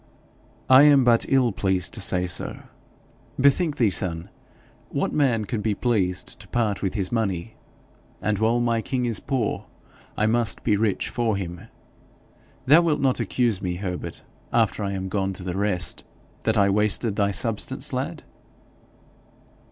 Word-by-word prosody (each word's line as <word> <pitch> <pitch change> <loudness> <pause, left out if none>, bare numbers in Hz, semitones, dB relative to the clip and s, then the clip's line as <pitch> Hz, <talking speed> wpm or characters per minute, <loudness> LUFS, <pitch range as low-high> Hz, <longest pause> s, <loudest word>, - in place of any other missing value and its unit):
'I 130 +1 +8
am 145 -2 +6
but 120 -2 +3
evil 130 -3 +3
pleased 95 -2 0
to 110 - -3
say 90 -2 +1
so. 90 - -4 0.8
Bethink 140 +3 +3
thee, 110 -5 +3
son 85 -1 -3 0.6
what - - -2
man 125 -7 +2
can 110 0 -3
be 105 -1 0
pleased 95 -7 -1
to - - -12
part 110 -4 -1
with 95 +1 -2
his 95 -3 -2
money? 110 -3 -2 0.6
And 105 -2 -1
while 115 +2 +2
my 115 -1 +1
king 125 +1 -2
is 115 -4 -2
poor, 130 -6 -2 0.5
I 105 - +2
must 115 0 +1
be 105 - +2
rich 105 -1 0
for 115 -4 0
him. 90 -2 -6 1.0
Thou 150 +6 +7
wilt 155 -3 +1
not 130 -2 +1
accuse 115 -2 0
me, 90 -1 -2
Herbert, 90 -1 -5 0.3
after 115 -2 +1
I 100 0 -2
am 95 -1 -3
gone 95 0 -1
to 95 - -9
the 90 -1 -4
rest, 95 -5 0 0.4
that 110 0 +2
I 100 -1 +4
wasted 105 +2 +1
thy 100 -1 +2
substance, 105 +2 -2
lad?' - - -3
110 Hz, 160 wpm, -24 LUFS, 95-120 Hz, 1.0 s, I